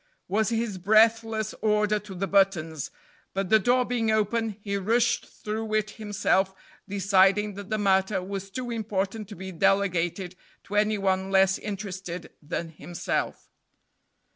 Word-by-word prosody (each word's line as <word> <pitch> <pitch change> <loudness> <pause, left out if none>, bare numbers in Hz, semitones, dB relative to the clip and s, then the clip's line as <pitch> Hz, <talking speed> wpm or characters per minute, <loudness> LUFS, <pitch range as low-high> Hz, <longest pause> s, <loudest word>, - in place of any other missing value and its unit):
was 215 +3 +1
his 225 -4 -2
breathless 220 +2 +3
older 210 -1 +2
to 205 -1 -10
the 190 +2 -1
buttons; 170 -6 +1 0.5
but 195 -1 -1
the 220 - +6
door 250 +4 +3
being 235 -3 0
open, 220 0 +1
he 200 -1 -3
rushed 230 +5 +1
through 215 +1 -5
it 215 -1 0
himself, 195 -3 0 0.3
deciding 200 +1 +3
that 200 0 -9
the 215 - 0
matter 190 -1 +2
was 195 +1 -5
too 245 +4 -5
important 215 -1 -2
to 210 - -8
be 190 +2 -7
delegated 185 -1 +1 0.3
to 200 - -10
any 210 +1 +2
one 190 -1 0
less 190 0 +4
interested 190 -4 -6
than 165 +2 -4
himself. 170 +2 -4
200 Hz, 140 wpm, -27 LUFS, 190-215 Hz, 0.5 s, the